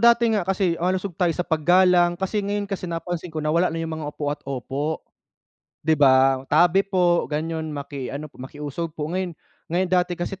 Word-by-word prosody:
dati 235 0 +5
nga 210 - +2
kasi 190 -1 +1
malusog 185 +2 0
tayo 180 - +4
sa 180 - -1
paggalang, 175 +2 +4
kasi 190 +3 -1
ngayon 205 0 -2
kasi, 195 -3 -5
napansin 170 +1 -4
ko 155 -2 -5
na 155 - +1
wala 170 +2 +3
na 165 - -4
'yong 165 -1 -3
mga 155 -2 -4
opo 150 0 -6
at 145 - -8
opo. 140 +4 -3 0.8
'Di 160 - +3
ba, 135 -2 +5
tabi 175 +5 +5
po, 180 -3 +2
ganyon, 160 +1 -3
maki 140 -3 -5
ano 140 +3 -5
po, - - -15
makiusog 150 +4 -6
po, 155 +1 -3
ngayon, 180 -3 -2 0.3
ngayon 180 +3 0
dati 180 -1 +2
kasi 175 +3 -4
170 Hz, 195 wpm, -23 LUFS, 150-185 Hz, 0.8 s, dati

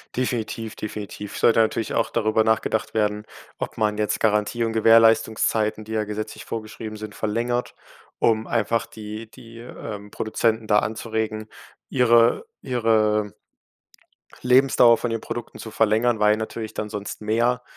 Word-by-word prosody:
Definitiv, 115 -3 -3
definitiv. 105 -1 -7
Sollte 115 - +4
natürlich 110 0 0
auch - - 0
darüber 110 -1 +2
nachgedacht 110 0 0
werden, 105 -1 0 0.3
ob - - -5
man 105 -1 +1
jetzt 105 -1 0
Garantie 105 +2 +1
und 115 -1 -1
Gewährleistungszeiten, 110 -1 +3
die 110 - -7
ja 110 - +1
gesetzlich 105 +1 -6
vorgeschrieben 110 -1 -6
sind, 105 -1 -8
verlängert, 120 +3 -2 0.5
um 110 -1 +2
einfach 115 0 0
die 110 +1 -8
die, 115 +1 -14
ähm, 105 -3 -8
Produzenten 110 0 -1
da 105 -1 +5
anzuregen, 110 0 -3 0.4
ihre 120 - +4 0.2
ihre 110 -4 +1 1.1
Lebensdauer 125 -2 +5
von 120 - -3
den 115 -1 -3
Produkten 120 - -6
zu 110 - -8
verlängern, 110 +2 +2
weil 105 0 +4
natürlich 110 0 -5
dann 105 - -4
sonst 105 0 -6
mehr, 120 +3 +1
110 Hz, 140 wpm, -23 LUFS, 105-115 Hz, 1.1 s, da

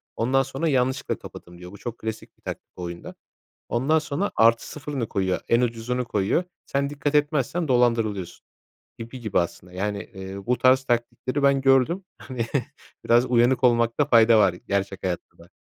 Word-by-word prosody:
ondan 135 +4 +2
sonra, 135 +5 -3
"Yanlışlıkla 130 0 0
kapattım" 85 0 -12
diyor. 90 +1 -10
Bu 100 - -11
çok 120 +1 -6
klasik 110 0 -7
bir - - -34
taktik - - -8
bu 90 - -7
oyunda. 85 0 -7 0.5
Ondan 135 +7 +2
sonra 155 +6 -2
+0'ını 115 +3 +1
koyuyor, 95 -2 -1
en 115 +1 +4
ucuzunu 120 +1 -1
koyuyor. 105 - 0 0.2
Sen 140 0 -1
dikkat 145 0 -2
etmezsen 150 +2 +1
dolandırılıyorsun. 115 -7 0 0.5
Gibi 115 +3 -8
gibi 110 -3 0
aslında, 90 +1 -3
yani, 100 +4 -4
ııı, 95 +1 -8
bu 125 -1 +1
tarz 130 +2 +4
taktikleri 125 +3 -1
ben 140 -1 +4
gördüm. 135 +8 +3
Hani, 125 -4 -4 0.6
biraz 120 +2 +4
uyanık 125 +1 +3
olmakta 120 +3 +3
fayda 115 -4 +5
var, 100 -4 +4
gerçek 100 +2 -3
hayatta 90 -2 -4
da. 85 - -16
120 Hz, 160 wpm, -24 LUFS, 105-135 Hz, 0.6 s, fayda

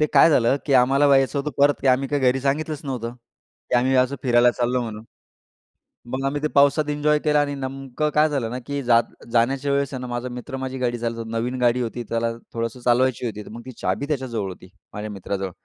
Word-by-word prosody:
ते 150 - +4
काय 165 - +7
झालं 125 -1 +3
की 145 - 0
आम्हाला 135 +3 +4
यायचं 135 0 +3
होतं 145 +2 -2
परत 145 0 +3
आम्ही 130 +1 +3
काही 145 -1 -1
घरी 130 +1 +3
सांगितलंच 150 +2 -1
नव्हतं, 120 -4 -4
की 125 +1 -7
आम्ही 130 +2 +2
अस 130 +1 +3
फिरायला 120 -1 +4
चाललो 125 +1 0
म्हणून. 110 -2 -7 1.1
मग 135 +1 -2
आम्ही 145 +1 -1
ते - - +3
पावसात 145 +2 +4
एन्जॉय 150 +1 +2
केला 150 -1 +4
आणि 145 0 -1
नेमकं 135 0 -5
काय 155 +1 +4
झालं 135 -6 -2
ना 125 - -4
की 140 0 -2
जात 120 -1 +4 0.3
जाण्याच्या 130 +4 +1
वेळेस 140 -1 0
आहे 130 - -4
ना, 125 - -5
माझा 120 +1 -4
मित्र 125 +3 -6
माझी 130 0 -4
गाडी 120 -2 -1
चालतो 115 0 -3
नवीन 115 +3 -3
गाडी 120 +1 +3
होती 120 0 -4
त्याला 115 0 0 0.2
थोडंसं 115 +2 -3
चालवायची 125 0 +2
होती 105 -2 -4
तर - - -11
मग 115 +2 -8
ती 130 - -7
चाबी 95 +10 -1
त्याच्याजवळ 125 -9 -2
होती, 90 0 -11 0.2
माझ्या 105 +1 -5
मित्राजवळ 95 -1 -4
130 Hz, 215 wpm, -23 LUFS, 120-140 Hz, 1.1 s, काय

